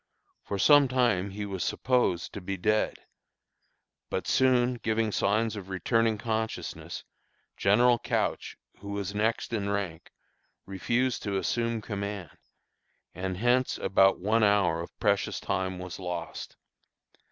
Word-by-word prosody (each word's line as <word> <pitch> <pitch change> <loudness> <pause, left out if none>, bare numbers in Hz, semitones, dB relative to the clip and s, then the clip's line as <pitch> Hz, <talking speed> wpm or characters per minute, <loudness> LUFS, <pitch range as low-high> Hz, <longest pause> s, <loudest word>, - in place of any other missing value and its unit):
For 100 - -4
some 145 +8 +6
time 120 -7 +1
he 105 +1 -5
was 95 -3 -3
supposed 125 -9 0
to 100 - -6
be 95 +2 -4
dead, 105 +4 0 1.0
but - - -2
soon 125 -1 +3
giving 110 -1 0
signs 110 +3 +1
of 95 -2 -8
returning 110 +3 +1
consciousness, 110 0 -4 0.5
General 120 +4 +4
Couch, - - -2 0.2
who 100 0 -7
was 100 -1 -3
next 110 +3 -1
in 100 -3 -1
rank, 95 -5 -3 0.5
refused 120 +6 -1
to 100 -2 -2
assume 115 +2 -1
command, 100 -3 -5 0.8
and 95 +1 -4
hence 125 +4 +2
about 95 0 +4
one 110 +4 +2
hour 100 -5 +3
of 85 - -10
precious - - +1
time 95 -1 -2
was 90 -1 -7
lost. 90 -2 -6
105 Hz, 130 wpm, -28 LUFS, 95-115 Hz, 1.0 s, some